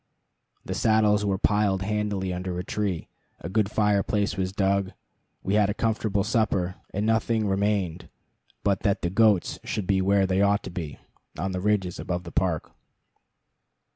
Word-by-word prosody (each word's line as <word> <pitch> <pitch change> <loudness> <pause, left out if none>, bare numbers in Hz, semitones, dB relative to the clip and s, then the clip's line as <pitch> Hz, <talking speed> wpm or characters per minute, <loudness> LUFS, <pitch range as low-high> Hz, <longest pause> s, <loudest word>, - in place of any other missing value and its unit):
The - - -3
saddles 105 -2 +3
were 100 -2 +1
piled 100 -1 +2
handily 105 -2 -1
under 90 0 -4
a 90 - -3
tree, 100 -4 -2 0.3
a - - -6
good 105 0 +1
fireplace 105 -1 +1
was 95 -1 -1
dug, 95 0 0 0.5
we 95 - -1
had 105 -1 +4
a 105 - -1
comfortable 110 -3 0
supper; 105 -5 0 0.2
and 100 +2 -1
nothing 110 0 +1
remained 95 -3 -1 0.5
but 100 -1 +2
that 100 -3 0
the 85 - 0
goats 105 -2 +3
should 105 -3 -3
be 95 0 +2
where 100 +1 +3
they 95 +1 +1
ought 100 +1 +3
to 95 - -7
be 85 -5 -6 0.4
on 95 +4 -2
the 90 0 -3
ridges 95 -3 0
above 90 -1 -3
the 85 - -9
park. 90 -4 -1
100 Hz, 165 wpm, -26 LUFS, 95-105 Hz, 0.5 s, had